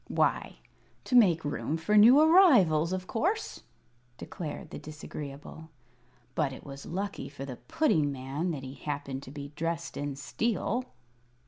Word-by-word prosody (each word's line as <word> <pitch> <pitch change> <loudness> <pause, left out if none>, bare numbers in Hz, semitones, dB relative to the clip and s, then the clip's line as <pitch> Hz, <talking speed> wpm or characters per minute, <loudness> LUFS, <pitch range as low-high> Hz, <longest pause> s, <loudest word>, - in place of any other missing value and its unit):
"Why, - - 0 0.5
to 250 - -1
make 180 -10 +5
room 145 +2 -2
for 165 +6 0
new 235 +7 +8
arrivals, 255 - +5
of 185 0 -3
course," 370 - -2 0.6
declared 165 +1 -7
the - - -6
Disagreeable. 150 0 -9 0.6
"But 145 -2 0
it - - -11
was 140 0 -9
lucky 195 +3 -4
for 140 -1 -8
the 130 -3 -7
Pudding 155 - +1
Man 135 +6 -3
that 145 -5 -4
he 130 0 -7
happened 140 -2 -5
to 135 - -11
be 140 -1 -7
dressed 165 +1 -3
in 145 -1 -3
steel." 225 - -2
160 Hz, 145 wpm, -29 LUFS, 140-205 Hz, 0.6 s, new